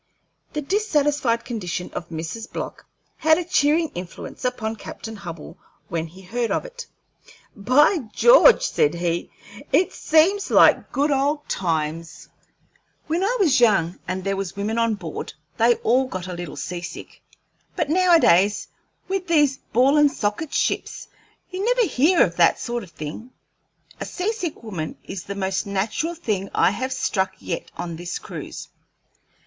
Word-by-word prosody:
The 300 - -3
dissatisfied 295 - +1
condition 180 -7 -4
of 170 - -6
Mrs. 170 +8 -6
Block - - -6 0.3
had 315 0 +4
a 355 - -1
cheering 320 0 +2
influence 175 +7 -8
upon 225 -3 -2
Captain 220 +1 -8
Hubbell 170 -6 -9 0.3
when 165 -1 -2
he 185 +4 -15
heard 235 +5 -2
of - - -1
it. - - -9 0.7
"By 265 - +4
George!" 485 - +6
said 150 +3 +1
he, 170 0 -2 0.4
"this 340 +6 +3
seems 360 +6 +2
like - - +5
good 290 +2 +1
old 285 +2 0
times. 165 -2 -3 0.8
When 330 +4 -1
I 475 +5 +1
was 330 -11 +4
young 195 -7 +3
and 185 0 -3
there 195 0 -1
was 195 -1 -4
women 210 +3 -2
on 230 -1 +2
board, 170 -6 -7 0.2
they 235 +1 +4
all 255 +3 +3
got 185 -7 -5
a 185 - -6
little 175 -3 -6
sea 175 -1 -5
sick; 175 - -9 0.5
but 325 -5 0
nowadays, 320 - +4 0.4
with 380 -1 -2
these 295 -5 +3
ball 265 +5 +4
and 295 -1 +5
socket 210 +9 -2
ships, - - -2 0.4
you 370 +1 -3
never - - +3
hear 320 +2 +4
of 170 -2 -2
that 170 -1 +4
sort 240 0 -3
of 195 - -11
thing. 160 +9 -8 0.7
A - - -4
sea 385 +5 -2
sick 350 - -5
woman 175 -8 -5
is 190 - -7
the 200 - -5
most 190 0 -2
natural 215 - -2
thing 210 - -2
I - - +4
have 260 +6 -3
struck 190 -6 -1
yet 170 - -5
on 170 -2 -5
this 175 +1 -4
cruise." - - -8
230 Hz, 155 wpm, -23 LUFS, -, 0.8 s, George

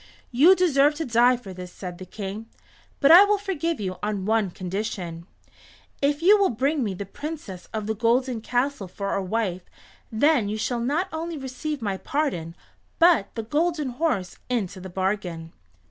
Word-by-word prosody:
"You 300 +10 +6
deserve 300 -5 +3
to 320 +1 -3
die 245 +1 +4
for 200 -6 -10
this," 180 -1 -9
said 180 -2 -8
the 185 - -9
King, 205 +3 -6 0.5
"but 280 - +5
I 355 +4 +11
will 410 0 +2
forgive 335 - -2
you 185 -3 -3
on 205 -2 -2
one 220 -2 +2
condition. 180 -2 -5 0.7
If 290 +3 +1
you 410 +4 +7
will 395 - +4
bring 275 +5 0
me 200 -4 -2
the 200 - -5
Princess 230 - -7
of 215 -1 -3
the 220 - -1
Golden 240 +2 +1
Castle 245 -2 -1
for 200 +2 -4
a 195 - 0
wife 185 -2 -2 0.4
then 235 -1 +3
you 215 - -2
shall 240 +2 -1
not 295 +10 0
only 325 0 -4
receive 270 +1 -5
my 200 -3 -1
pardon, 190 - -2 0.4
but 330 - +5
the 225 - -3
Golden 300 +3 0
Horse 245 - -2
into 205 -6 -2
the 190 - -8
bargain." 180 -3 -3
230 Hz, 175 wpm, -25 LUFS, 195-295 Hz, 0.7 s, I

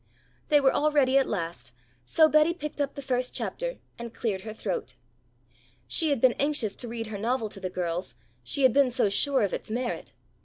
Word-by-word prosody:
They 295 - +6
were 270 -2 +4
all 305 +1 +2
ready 275 -2 +4
at 270 - 0
last, 165 - -4 0.3
so 315 - +5
Betty 305 +2 +4
picked 300 -4 -5
up 280 -1 -2
the 280 - -7
first 250 -1 -1
chapter - - -3 0.2
and 235 -1 -6
cleared 205 -5 -2
her 215 +2 -7
throat. 185 - -4 0.9
She 320 - +2
had 280 -4 +1
been 255 0 +5
anxious 280 -8 0
to 245 - -4
read 230 0 -4
her 215 -2 -6
novel 230 0 -1
to 200 - -9
the 185 -1 -4
girls, 180 -5 -3 0.3
she 275 - -1
had 260 -3 +6
been 280 -1 +4
so 245 -4 +1
sure 265 +5 +2
of 200 - -1
its - - -5
merit. 240 +2 -3
245 Hz, 205 wpm, -27 LUFS, 200-280 Hz, 0.9 s, They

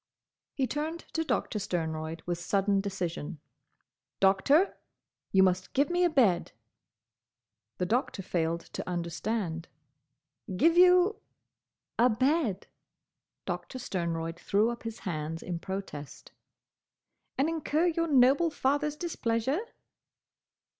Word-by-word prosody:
He 270 - +1
turned 310 +5 -3
to 325 - 0
Doctor 220 -8 -1
Sternroyd 160 -4 -3
with 175 -1 -2
sudden 195 +2 +1
decision. 180 -5 -4 0.8
"Doctor! 195 - +3 0.5
You 190 -1 +5
must 185 0 +1
give 280 +4 +2
me 355 +1 +2
a 350 - +4
bed." 225 - +2 1.2
The 180 - 0
Doctor 225 -1 -1
failed 170 -1 -1
to - - -5
understand. 175 0 -3 0.9
"Give 330 - +4
you—?" 360 +3 +6 0.8
"A 245 +2 +6
bed." 255 - +1 0.8
Doctor 260 - -4
Sternroyd 170 -6 -3
threw 215 +4 +2
up 235 - -7
his 225 -1 -6
hands 160 -3 -4
in 175 -2 -4
protest. 190 -6 -7 1.1
"And 275 - +2
incur 320 0 0
your 335 -1 +1
noble 280 +3 +5
father's 290 +1 0
displeasure?" 265 -4 -1
215 Hz, 110 wpm, -29 LUFS, -, 1.2 s, you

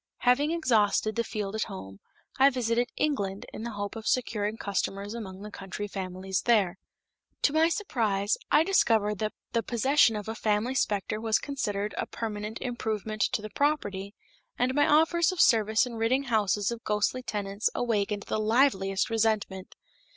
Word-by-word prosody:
Having 250 +5 +3
exhausted 220 -9 +2
the 235 - +1
field 210 -3 -4
at 220 - -1
home, 95 - -9 0.4
I 270 +1 +7
visited 240 -2 0
England 200 -10 -1
in - - -6
the 235 0 -5
hope 205 +1 -4
of 220 -1 -6
securing 220 -4 0
customers 200 0 -3
among 195 -4 -7
the 210 - -8
country 200 +1 -6
families 190 -1 -3
there. 200 -6 +2 0.6
To 285 - +3
my 320 +1 +4
surprise, 220 - 0
I 300 - +5
discovered 220 - +2
that 215 -1 -2 0.2
the 230 - +1
possession 240 +1 +3
of 210 -1 -5
a 220 - -2
family 215 +3 0
specter 215 -3 -1
was 225 -1 +2
considered 210 -7 -3
as - - -3
a - - -4
permanent 215 -1 -5
improvement 220 -3 -3
to 210 - -1
the 215 - -7
property, 205 -9 -1 0.4
and 250 +1 +1
my 290 +2 +3
offers 320 +2 +4
of 370 - -6
service 220 -1 +4
in 250 - -7
ridding 230 +4 +1
houses 210 -4 +1
of 235 -1 -6
ghostly 210 +4 0
tenants 205 -3 -2
awakened 210 -3 0
the - - -2
liveliest 215 -3 +2
resentment. 215 -4 -1
220 Hz, 165 wpm, -28 LUFS, 205-245 Hz, 0.6 s, I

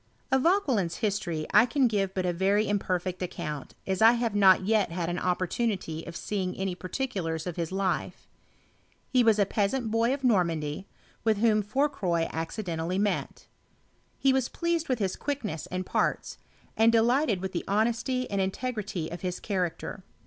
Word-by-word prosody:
Of 265 0 +4
Vauquelin's 265 - +2
history 195 -8 -2
I 240 - +7
can 260 +1 +3
give 195 -4 -1
but 185 -1 -1
a 175 - +1
very 195 +4 +2
im 205 -1 +1
perfect 185 -1 -2
account, 160 -6 -5
as 190 0 -1
I 225 +2 +8
have 235 -2 -1
not 190 -2 +5
yet 210 -3 +2
had 170 0 -3
an 175 +1 -2
opportu 185 +6 0
nity 165 -5 -5
of 170 - -7
seeing 185 -2 -3
any 190 -1 -1
particulars 180 - -3
of 175 -3 -4
his 170 -1 -3
life. 190 -1 -2 0.8
He 255 -2 +3
was 225 -2 +4
a 200 - +4
peasant 220 +4 -1
boy 230 +2 +2
of 275 0 -2
Normandy, 170 - +1 0.4
with 220 -2 +2
whom 215 0 +3
Fourcroy 210 - 0
ac 165 +7 -3
cidentally 170 +1 -2
met. 205 0 -2 0.7
He 270 -1 +3
was 260 -2 +1
pleased 340 -2 -1
with 255 - +2
his 195 -4 -1
quickness 225 - -4
and 185 0 -4
parts, - - -1 0.4
and 225 +1 +5
delighted 235 -1 +3
with 190 +1 -4
the 175 - -3
honesty 235 +5 0
and 200 -1 +1
in 190 - +1
tegrity 205 -8 -4
of 175 - -7
his 180 -1 -3
character. 185 0 -3
200 Hz, 180 wpm, -28 LUFS, 180-230 Hz, 0.8 s, I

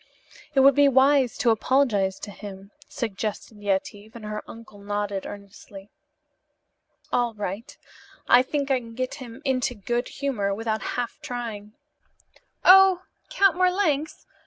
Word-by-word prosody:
"It 270 - +5
would 275 +1 +7
be 285 +1 +5
wisdom 265 -1 +3
to 240 - +4
apologize 220 -5 +1
to 205 - -7
him," 200 -1 -10 0.2
suggested 215 -1 -5
Yetive, 205 +2 -3
and 225 -2 -9
her 210 0 -4
uncle 225 -3 -12
nodded 205 -1 -3
earnestly. 200 0 -12 1.2
"All 240 -2 +1
right. 205 +4 -6 0.5
I 250 - +7
think 280 +1 -2
I 260 - +3
can 230 -2 -12
get 255 +1 -3
him 250 +3 -10
into 260 -1 0
good 240 +4 -2
humor 210 -9 -2
without 220 0 -2 0.2
half 245 -1 -3
trying. 220 -4 -6 0.9
Oh, 380 -1 +7 0.3
Count 395 -1 +3
Marlanx! 360 -5 0
230 Hz, 135 wpm, -25 LUFS, 205-270 Hz, 1.2 s, would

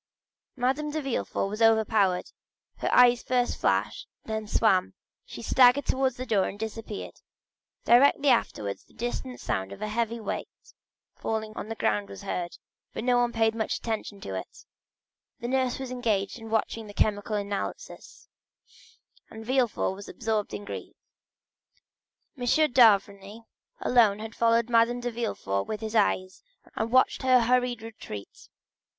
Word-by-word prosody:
Madame 270 +4 0
de 310 +1 -2
Villefort 270 -7 -2
was 210 +3 -5
overpowered; 220 -4 +3 0.5
her - - -2
eyes 245 -1 +6
first 250 -1 0
flashed - - 0 0.2
and 220 - -6
then 220 -1 -3
swam, 195 -4 +2 0.3
she - - -9
staggered 255 +2 +5
towards 260 -1 0
the 255 - -4
door 205 -6 +2
and 200 - -7
disappeared. 220 -1 -6 0.6
Directly 280 +3 +5
afterwards 105 - 0
the - - -26
distant 245 +2 -4
sound 95 0 -3
of - - -9
a 215 - -3
heavy 230 +1 -1
weight 215 - -4 0.7
falling 220 -1 -3
on 215 - -6
the 225 - -4
ground 105 - 0
was 100 -1 -10
heard, 175 -1 -4 0.4
but - - -3
no 245 0 +3
one 240 0 +1
paid 225 -1 +2
any 225 -1 -1
attention 220 -3 -4
to 95 - -6
it; 95 - -7 0.7
the 235 - -4
nurse 260 -1 0
was 265 -1 -6
engaged 220 -4 -1
in 225 0 -9
watching 225 0 -1
the 205 - -11
chemical 210 0 0
analysis, 200 -1 -5 1.0
and 220 0 -10
Villefort 255 -5 +1
was 200 +1 -10
still - - -10
absorbed 220 -2 -1
in 205 - -7
grief. - - -7 1.4
M. 250 -3 -5 0.3
d'Avrigny 205 -2 +3 0.4
alone 225 -5 +4
had 220 +1 -7
followed 230 0 +2
Madame 235 +1 +3
de 245 0 -3
Villefort 155 - -2
with 215 0 -4
his 220 0 -5
eyes, 185 -3 +1 0.3
and 220 +1 -2
watched 255 +1 +3
her 255 -2 +5
hurried 245 -1 +1
retreat. 215 - -10
225 Hz, 155 wpm, -27 LUFS, 205-245 Hz, 1.4 s, eyes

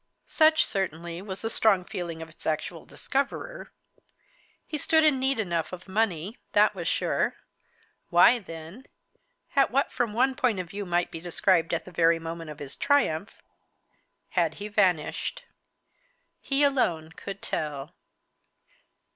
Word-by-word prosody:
Such, 315 -1 +4
certainly, 170 -3 -3
was 190 0 -6
the 225 - -1
strong 195 -6 +3
feeling 170 -3 -5
of 160 - -11
its 160 - -9
actual 155 - -2
discoverer. 395 - -3 0.9
He 305 - -4
stood 320 0 +4
in 300 -4 +4
need 265 -2 +1
enough 170 -6 -1
of 180 0 -9
money; 195 0 -1
that 210 +1 +5
was 175 -4 -5
sure. - - 0 0.7
Why 180 +8 +6
then, 165 +5 -10 0.7
at 275 - +5
what 275 +3 +1
from 230 -3 -1
one 260 +4 +3
point 245 -6 +1
of 180 -2 -5
view 200 -1 -5
might 175 0 0
be 165 - -6
described 175 0 +2
as 170 - -1
the 185 - -12
very 165 -1 +4
moment 165 0 -6
of 150 - -8
his 145 -2 -6
triumph, 210 - 0 0.9
had 165 -3 +1
he 210 +1 -6
vanished? 200 - 0 1.0
He 275 +1 +1
alone 175 - +1
could 195 +4 -8
tell. 150 +1 -3
185 Hz, 145 wpm, -27 LUFS, 165-240 Hz, 1.0 s, Why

